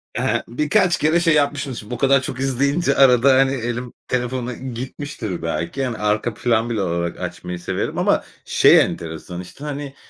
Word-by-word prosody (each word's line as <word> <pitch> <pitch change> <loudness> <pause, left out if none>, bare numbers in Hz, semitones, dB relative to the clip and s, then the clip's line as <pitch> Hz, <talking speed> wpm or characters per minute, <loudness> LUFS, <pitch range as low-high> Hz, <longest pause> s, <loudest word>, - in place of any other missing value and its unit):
ehe, - - 0
birkaç 170 - +2
kere 155 +3 +2
şey 170 -2 +3
yapmışım 145 -2 0
şimdi 105 0 -9
bu - - -3
kadar 135 -1 +4
çok 130 0 -5
izleyince. 140 +3 +1
Arada, 130 0 +6
hani, 135 0 +4
elim 120 0 -4
telefona 125 0 -2
gitmiştir 125 - -6
belki. 85 - -2
Hani, 120 -3 -3
arka 105 +2 0
plan 115 +1 0
bile 110 -4 -1
olarak 85 -1 -2
açmayı 90 0 -5
severim - - -3
ama - - +2 0.2
şey - - +6
enteresan, 85 +2 -4
işte, 90 +10 -12
hani, 145 -1 -5
125 Hz, 165 wpm, -21 LUFS, 110-140 Hz, 0.2 s, Arada